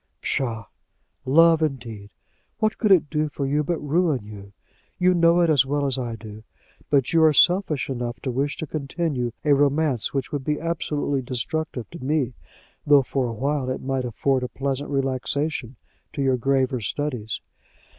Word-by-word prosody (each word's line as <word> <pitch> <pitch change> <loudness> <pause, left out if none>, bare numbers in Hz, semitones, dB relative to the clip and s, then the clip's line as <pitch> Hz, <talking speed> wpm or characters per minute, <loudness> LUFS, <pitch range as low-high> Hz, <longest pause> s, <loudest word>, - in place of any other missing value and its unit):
"Psha! 115 -5 -2 0.6
Love, 165 +3 +5
indeed. 115 -9 -3 0.5
What 215 -1 0
could 215 -3 +2
I 190 - +9
do 155 -1 -2
for 145 -1 -4
you 145 +2 +1
but 170 +3 -1
ruin 150 - 0
you? 100 -2 -11 0.5
You 180 0 +4
know 170 0 +4
it 170 - +3
as 140 -4 +5
well 140 +1 -1
as 135 -1 0
I 120 -2 -3
do; 110 -1 -10 0.5
but 140 -1 +2
you 165 -1 +5
are 155 -1 +6
selfish 175 -3 +3
enough 120 -2 -4
to 130 - -2
wish 140 +4 -1
to 160 - -4
continue 140 -4 -2
a 145 - +5
romance 140 -3 +1
which 135 -2 -3
would 145 -2 -3
be 150 +2 -1
absolutely 150 -4 -1
destructive 130 +1 -3
to 170 -5 -9
me, 135 -3 0 0.5
though 145 -2 +5
for 130 0 -1
a 115 - -4
while 135 +2 -1
it 130 - -4
might 135 -1 -1
afford 130 +2 0
a 125 - -2
pleasant 135 +2 -3
relaxation 135 -1 -2 0.4
to 140 - -2
your 130 -1 +3
graver 130 0 0
studies. 125 -3 -3
140 Hz, 175 wpm, -24 LUFS, 125-155 Hz, 0.6 s, I